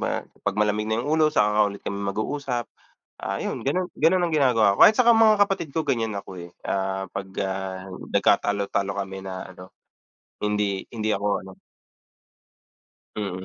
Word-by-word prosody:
ma - - -2
kapag 100 0 -5
malamig 105 0 +1
na 110 +2 -1
yung 155 +2 +1
ulo, 155 - +5
saka 105 -9 +2
lang 105 0 +4
ulit - - -19
kami 100 - -3
mag-uusap. 120 +4 -2 0.5
Ah, - - -4
'yon, - - -4
gano'n 180 +6 0
gano'n 175 +4 +3
ang 170 -2 0
ginagawa 115 -9 +3
ko, - - +9
kahit 215 - +7
saka 235 -2 +5
mga 220 -1 +6
kapatid 195 -6 +1
ko, 160 - +1
ganyan 115 -7 -1
ako, 100 -2 -7
eh, 85 - -16 0.2
ah, 95 -1 -2
'pag, 95 0 -5
ah, 95 0 -4
nagkatalo-talo 100 +1 0
kami 95 0 -6
na 95 -1 -6
ano, 90 0 -13 0.7
hindi 105 -2 -1
hindi 110 -1 -1
ako 100 -1 -1 0.2
ano. 95 0 -11 1.6
Mm, 95 -3 -4
105 Hz, 170 wpm, -24 LUFS, 95-140 Hz, 1.6 s, ko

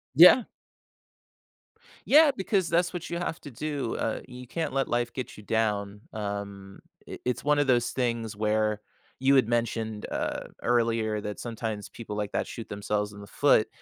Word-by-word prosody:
Yeah. 180 - +9 1.6
Yeah, 305 0 +7
because 190 -3 +1
that's 175 +2 +2
what 175 -2 -5
you 170 - -2
have 175 -2 -3
to 145 - -9
do, 140 -1 -3
uh, 110 - -2
you 125 0 -9
can't 165 +4 -3
let 135 -1 0
life 120 0 0
get 130 - -6
you 105 - -11
down, 105 -2 -1
um, 100 -2 -5 0.3
it - - -8
it's 125 -1 -1
one 150 0 +4
of 145 - +2
those 120 -2 +3
things 115 -4 -1
where, 105 0 +1 0.4
you 135 +1 +4
had 130 -5 +5
mentioned, 115 -2 -1
uh, - - -2 0.2
earlier 115 -3 +1
that 105 0 -5
sometimes 110 -3 -4
people 110 -3 -7
like 105 -1 -3
that - - 0
shoot 115 - -7
themselves 105 0 -2
in 100 - -10
the 100 - -10
foot, 125 -5 +4
115 Hz, 175 wpm, -28 LUFS, 105-135 Hz, 1.6 s, Yeah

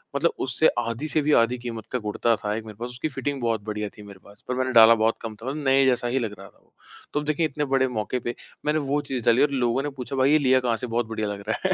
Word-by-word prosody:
मतलब 165 +4 +2
उससे 135 +5 +3
आधी 115 +5 -3
से 155 0 +1
भी 150 +1 +1
आधी 125 +2 -2
कीमत 115 -2 -6
का 125 - -1
कुर्ता 110 +2 0
था, 105 0 -3
1 110 0 -5
मेरे 110 -1 -10
पास 120 +1 -4
उसकी 125 +5 -4
फ़िटिंग 135 0 -3
बहुत 115 -3 0
बढ़िया 105 0 -4
थी, 105 - -11
मेरे 100 -2 -12
पास 100 0 -18
पर 125 - -2
मैंने 130 0 -1
डाला 115 0 +8
बहुत 110 +1 +1
कम 110 -2 -6
था 115 +3 -12
और 135 - -3
नए 135 -2 +3
जैसा 125 -1 +2
ही 130 +2 0
लग 110 -3 -3
रहा 100 - -10
था - - -23
वो। - - -35 0.4
तो 150 - +1
अब 150 - -5
देखें, 155 +2 0
इतने 150 0 -2
बड़े 135 -1 +2
मौक़े 125 +1 -2
पे 120 0 -4 0.3
मैंने 150 +1 +2
वो 145 +1 +1
चीज़ 125 -3 -2
डाली 120 +1 +4
और 145 - +3
लोगों 125 -1 +1
ने 145 - -2
पूछा 130 +2 -5
भाई 135 +2 +3
ये 155 - +6
लिया 130 -2 +4
कहाँ 120 -2 0
से? 125 - -5
बहुत 115 +1 -1
बढ़िया 110 -1 -3
लग 100 -1 -4
रहा 110 - -1
है। 185 - +2
125 Hz, 300 wpm, -25 LUFS, 115-135 Hz, 0.4 s, डाला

